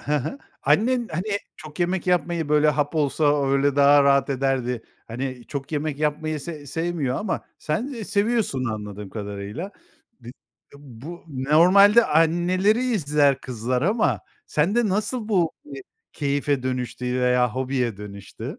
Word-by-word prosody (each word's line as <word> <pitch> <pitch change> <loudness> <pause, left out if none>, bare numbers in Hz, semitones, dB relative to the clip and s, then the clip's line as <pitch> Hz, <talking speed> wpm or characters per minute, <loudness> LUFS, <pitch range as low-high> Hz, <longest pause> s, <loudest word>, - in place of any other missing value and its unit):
Hı 150 - -1
hı. 150 - -3 0.2
Annen, 230 - +2
hani, 200 +6 -2 0.2
çok 155 +2 -10
yemek 180 +1 0
yapmayı 170 -3 0
böyle, 150 0 +4
hap 145 +1 0
olsa 145 -1 +2
öyle 140 0 +2
daha 145 0 +6
rahat 140 0 +3
ederdi. 130 -3 -1 0.3
Hani, 125 +1 -5
çok 140 +1 -6
yemek 150 -1 -2
yapmayı 150 0 -1
se 150 -2 -8
sevmiyor 160 -3 -2
ama 205 -3 -2 0.2
sen 155 +11 -2
ı 215 - -5
seviyorsun 205 - 0
anladığım 105 -3 -5
kadarıyla. 105 - -6 0.5
B 120 - -12
bu, - - -5 0.4
eee, 140 - -14
bu 145 +5 -11
normalde 180 - +5
anneleri 175 +8 +2
izler 150 - +2
kızlar 125 +1 -2
ama 210 +6 +1 0.3
sende 205 +9 +1
nasıl 215 +4 -2
bu, 175 -7 +2
eee, 140 -2 -9 0.3
keyfe 140 -1 -1
dönüştü 125 -1 -3 0.2
veya 125 -1 +3
hobiye 130 -4 -1
dönüştü? 100 -1 -8
145 Hz, 140 wpm, -23 LUFS, 130-175 Hz, 0.5 s, daha